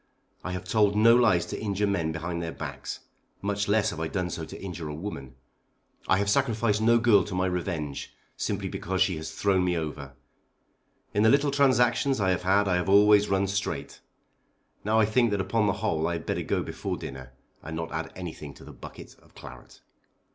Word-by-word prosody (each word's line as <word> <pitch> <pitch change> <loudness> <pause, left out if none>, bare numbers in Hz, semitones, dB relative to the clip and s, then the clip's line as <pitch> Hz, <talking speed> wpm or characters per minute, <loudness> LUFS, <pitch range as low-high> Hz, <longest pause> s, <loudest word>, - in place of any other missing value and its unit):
I 90 - -4
have 90 - -4
told 105 -2 +2
no 115 +2 +6
lies 110 -8 +3
to - - -6
injure 105 -1 -1
men 85 -6 0
behind 85 +1 -4
their 85 -1 -4
backs; - - -7 0.4
much 100 0 -2
less 110 +1 +2
have 80 - -7
I 80 - -1
done 90 +1 -3
so 80 - -5
to - - -10
injure 85 -5 -6
a 75 - -5
woman. 70 -7 -7 0.7
I 95 - +4
have 100 +1 0
sacrificed 110 -2 +1
no 115 +1 +5
girl 115 -5 +4
to 95 - -6
my 90 0 +1
revenge, 85 -6 -3 0.2
simply - - -2
because 95 +1 0
she 95 -1 -1
has 80 0 -6
thrown 95 -2 +1
me 90 -1 0
over. 75 -4 -5 1.0
In 105 - +2
the 110 - +5
little 140 +3 +3
transactions 135 -1 +3
I 95 -2 +2
have 90 - 0
had 100 +2 +2
I 90 -2 +2
have 90 +1 -2
always 105 +1 +6
run 95 0 +2
straight. 100 0 -4 0.8
Now 110 +2 +2
I 110 - +5
think 120 +2 +2
that 100 -1 -1
upon 105 +3 +1
the 100 - +2
whole 80 0 0
I 85 - -1
had 85 - -5
better - - -1
go - - -1
before - - -4
dinner, 65 -1 -9 0.3
and 80 +2 -7
not 80 0 -4
add 80 0 -4
anything 80 -5 -8
to - - -14
the - - -11
bucket - - -11
of - - -25
claret." - - -13
95 Hz, 205 wpm, -27 LUFS, 85-105 Hz, 1.0 s, no